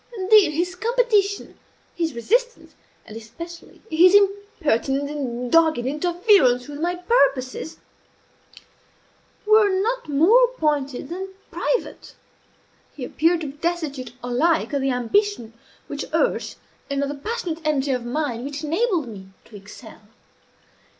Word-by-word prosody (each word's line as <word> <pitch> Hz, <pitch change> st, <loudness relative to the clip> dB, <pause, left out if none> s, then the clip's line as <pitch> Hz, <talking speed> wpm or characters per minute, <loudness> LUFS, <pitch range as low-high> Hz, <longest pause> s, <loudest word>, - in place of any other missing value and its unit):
Indeed, 385 Hz, -4 st, +5 dB
his 350 Hz, +4 st, -1 dB
competition, 430 Hz, -1 st, 0 dB, 0.3 s
his 325 Hz, -6 st, -2 dB
resistance, 475 Hz, -, -1 dB, 0.3 s
and 215 Hz, -, -11 dB
especially 330 Hz, +11 st, -11 dB
his 355 Hz, +4 st, +6 dB
impertinent 310 Hz, -, +1 dB
and 250 Hz, -4 st, -4 dB
dogged 325 Hz, -1 st, +4 dB
interference 295 Hz, -, +2 dB
with 290 Hz, 0 st, -8 dB
my 350 Hz, +2 st, -1 dB
purposes, 300 Hz, -, 0 dB, 1.7 s
were 430 Hz, -1 st, +5 dB
not 410 Hz, +1 st, -1 dB
more 390 Hz, -, +5 dB
pointed 285 Hz, -3 st, -1 dB
than 380 Hz, +2 st, -6 dB, 0.2 s
private. -, -, -3 dB, 0.8 s
He 265 Hz, -, -6 dB
appeared 330 Hz, +5 st, +1 dB
to 305 Hz, -, -4 dB
be 285 Hz, -, -20 dB
destitute 310 Hz, -6 st, -3 dB
alike 300 Hz, +7 st, +1 dB
of 280 Hz, -, 0 dB
the 270 Hz, -, 0 dB
ambition 250 Hz, -, 0 dB, 0.3 s
which -, -, -5 dB
urged, -, -, 0 dB, 0.3 s
and 280 Hz, 0 st, -1 dB
of 280 Hz, -, -2 dB
the -, -, -3 dB
passionate 335 Hz, +1 st, -4 dB
energy 290 Hz, -3 st, 0 dB
of 250 Hz, -2 st, -1 dB
mind 245 Hz, -1 st, -3 dB
which 285 Hz, +2 st, -6 dB
enabled, 340 Hz, -, 0 dB
me 195 Hz, -4 st, -10 dB, 0.2 s
to 215 Hz, -, -16 dB
excel. 205 Hz, +3 st, -13 dB
315 Hz, 125 wpm, -22 LUFS, 265-380 Hz, 1.7 s, his